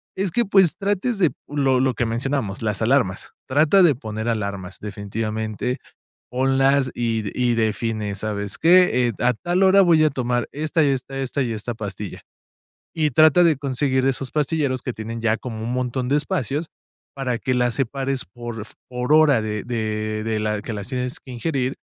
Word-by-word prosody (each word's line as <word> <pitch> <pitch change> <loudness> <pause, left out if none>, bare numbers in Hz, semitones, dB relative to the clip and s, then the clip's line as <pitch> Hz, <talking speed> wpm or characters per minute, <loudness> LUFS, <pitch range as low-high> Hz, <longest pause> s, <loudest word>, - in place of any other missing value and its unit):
es 190 -1 -1
que, 240 +8 +2
pues, 195 -4 +4
trates 205 +3 -1
de 175 -6 +3 0.2
lo 135 -3 +1
lo 130 0 +2
que 120 - -1
mencionamos, 115 -3 -2
las 105 -2 -2
alarmas, 110 -5 +1 0.2
trata 155 +8 +4
de 165 -6 +5
poner 110 -2 -5
alarmas, 100 -5 -3
definitivamente, 110 +3 -3 0.5
ponlas 135 +1 +2
y 115 -2 -1 0.2
y 120 -1 +2
define: 110 -2 -1
"¿Sabes 100 0 -4
qué?, 170 -8 +5
eh, 120 - -1
a 125 +1 +3
tal 175 - 0
hora 190 +1 +6
voy 165 -3 +5
a 155 - +4
tomar 125 -3 -1
esta 155 +2 0
y 145 - +3
esta, 135 0 -3
esta 135 +1 -2
y 120 - -2
esta 110 +2 -4
pastilla", 105 -2 -6 0.7
y 155 -2 +1
trata 155 +5 +6
de 165 -4 +4
conseguir 130 -1 0
esos 135 -1 -1
pastilleros 145 -4 0
que 125 - -4
tienen 115 +1 -6
ya 110 -1 +2
como 110 -3 -6
un 120 +2 -2
montón 125 0 -2
de 145 - +3
espacios 150 - -2 0.5
para 130 -3 -2
que 130 - -1
las 125 -1 +1
separes 135 0 -2
por 115 +2 -7 0.2
por 125 +3 0
hora 150 -6 +5
de 105 -1 -3
de 110 -2 -2
de 110 -1 -1
la 105 -1 -1
que 115 - -5
las 100 -2 -5
tienes 125 -1 -3
que - - -17
ingerir 130 +1 -2
125 Hz, 180 wpm, -22 LUFS, 110-145 Hz, 0.7 s, hora